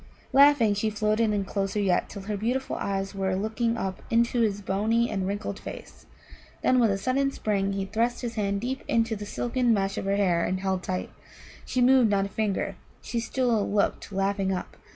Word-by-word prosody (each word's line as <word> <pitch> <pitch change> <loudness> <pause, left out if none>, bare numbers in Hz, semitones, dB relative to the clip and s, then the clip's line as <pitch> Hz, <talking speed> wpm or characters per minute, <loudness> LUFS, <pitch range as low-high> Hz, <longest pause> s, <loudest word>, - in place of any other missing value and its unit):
Laughing, 275 -6 +6
she 210 +2 0
floated 215 +1 +1
in 205 -2 0
closer 195 +1 -2
yet, 190 -3 +1
till 200 - -8
her 210 +1 -3
beautiful 245 +6 -1
eyes 195 0 -2
were 190 -1 -1
looking 225 +4 -1
up 190 -4 -3
into 235 +1 +2
his 205 -3 +1
bony 220 +4 +1
and 190 -2 -1
wrinkled 205 +2 -3
face. - - -10 0.6
Then 255 - +4
with 230 -2 +4
a 195 - +1
sudden 260 +7 +1
spring 200 -6 -1
he 195 0 -2
thrust 230 +5 -1
his 235 -1 -3
hand 200 -2 -1
deep 260 +3 -3
into 225 -1 +1
the 205 0 -7
silken 240 +1 +1
mesh 195 -1 -1
of - - -5
her 195 0 +1
hair 175 -4 +2
and 185 +1 -1
held 190 -1 -1
tight. 185 0 -3 0.6
She 255 - 0
moved 250 -2 +5
not 200 -1 +2
a - - -6
finger; 210 -1 -2 0.2
she 235 - -3
still 230 -2 0
looked 205 0 0
laughing 195 0 0
up. 185 - -4
210 Hz, 195 wpm, -27 LUFS, 195-235 Hz, 0.6 s, Laughing